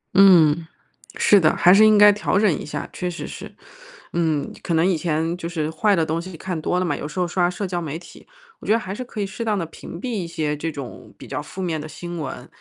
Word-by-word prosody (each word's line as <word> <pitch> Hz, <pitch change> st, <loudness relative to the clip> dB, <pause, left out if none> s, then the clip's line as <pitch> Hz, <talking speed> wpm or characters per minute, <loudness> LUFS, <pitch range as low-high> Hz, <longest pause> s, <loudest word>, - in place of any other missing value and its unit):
嗯， 170 Hz, -5 st, +6 dB, 0.5 s
是 205 Hz, -, +5 dB
的， 155 Hz, -4 st, +3 dB
还 180 Hz, -, +6 dB
是 215 Hz, +2 st, +7 dB
应 215 Hz, -1 st, +5 dB
该 205 Hz, 0 st, +8 dB
调 205 Hz, -2 st, 0 dB
整 210 Hz, -2 st, +4 dB
一 -, -, -6 dB
下， 150 Hz, -, -5 dB
确 180 Hz, -, -3 dB
实 175 Hz, -, -6 dB
是。 -, -, -8 dB, 0.6 s
嗯， 160 Hz, -4 st, 0 dB
可 170 Hz, -, -1 dB
能 160 Hz, +1 st, +3 dB
以 185 Hz, -1 st, +2 dB
前 160 Hz, +1 st, -1 dB
就 170 Hz, -2 st, -5 dB
是 160 Hz, -2 st, -2 dB
坏 200 Hz, +6 st, +2 dB
的 165 Hz, -2 st, +1 dB
东 160 Hz, +2 st, -2 dB
西 180 Hz, -1 st, -9 dB
看 175 Hz, -1 st, -4 dB
多 180 Hz, -, 0 dB
了 185 Hz, -, 0 dB
嘛， 170 Hz, -, 0 dB
有 -, -, -5 dB
时 150 Hz, +4 st, -6 dB
候 180 Hz, -, +1 dB
刷 175 Hz, 0 st, +1 dB
社 180 Hz, +3 st, -4 dB
交 175 Hz, -2 st, -3 dB
媒 155 Hz, -1 st, -4 dB
体， 170 Hz, -, -15 dB, 0.3 s
我 -, -, -11 dB
觉 -, -, +2 dB
得 -, -, +4 dB
还 190 Hz, -4 st, -5 dB
是 255 Hz, -, -5 dB
可 240 Hz, -3 st, -9 dB
以 205 Hz, -, 0 dB
适 195 Hz, +4 st, -6 dB
当 215 Hz, -2 st, 0 dB
地 170 Hz, -, -2 dB
屏 165 Hz, +1 st, -10 dB
蔽 255 Hz, -, -4 dB
一 200 Hz, -8 st, -3 dB
些 155 Hz, -3 st, -2 dB
这 160 Hz, +2 st, -4 dB
种 140 Hz, -5 st, -9 dB
比 -, -, -11 dB
较 -, -, -4 dB
负 190 Hz, -, -7 dB
面 160 Hz, -4 st, -2 dB
的 155 Hz, -, -7 dB
新 175 Hz, +2 st, -7 dB
闻， 135 Hz, -3 st, -6 dB
175 Hz, 285 characters per minute, -22 LUFS, 160-190 Hz, 0.6 s, 该